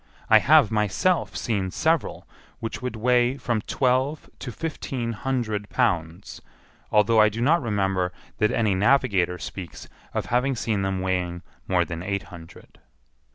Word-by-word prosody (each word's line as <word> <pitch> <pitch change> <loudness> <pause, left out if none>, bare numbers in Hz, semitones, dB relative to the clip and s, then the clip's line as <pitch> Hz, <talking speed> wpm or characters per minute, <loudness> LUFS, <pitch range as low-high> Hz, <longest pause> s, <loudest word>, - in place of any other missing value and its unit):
I 110 - +9
have 145 -3 +5
myself 110 - 0
seen 100 -5 -1
several 160 - -1 0.3
which 115 +2 -5
would 125 -2 -4
weigh 125 +3 +2
from 120 -4 -1
twelve 130 +6 0
to 125 - -6
fifteen 130 -4 -4
hundred 110 -4 -2
pounds, 90 -7 -1 0.5
although 110 +1 +4
I 110 - +5
do 110 +2 -6
not 150 +8 +3
remember 95 -5 0 0.3
that 105 - +3
any 110 -3 +1
navigator 100 -4 +2
speaks 90 -1 -8 0.3
of - - -1
having 125 +3 +1
seen 110 -4 -1
them 95 -1 -1
weighing 90 -2 -2 0.2
more 90 -2 +2
than 85 -1 -6
eight 100 +1 -2
hundred. 80 -1 -13
110 Hz, 145 wpm, -24 LUFS, 95-125 Hz, 0.5 s, I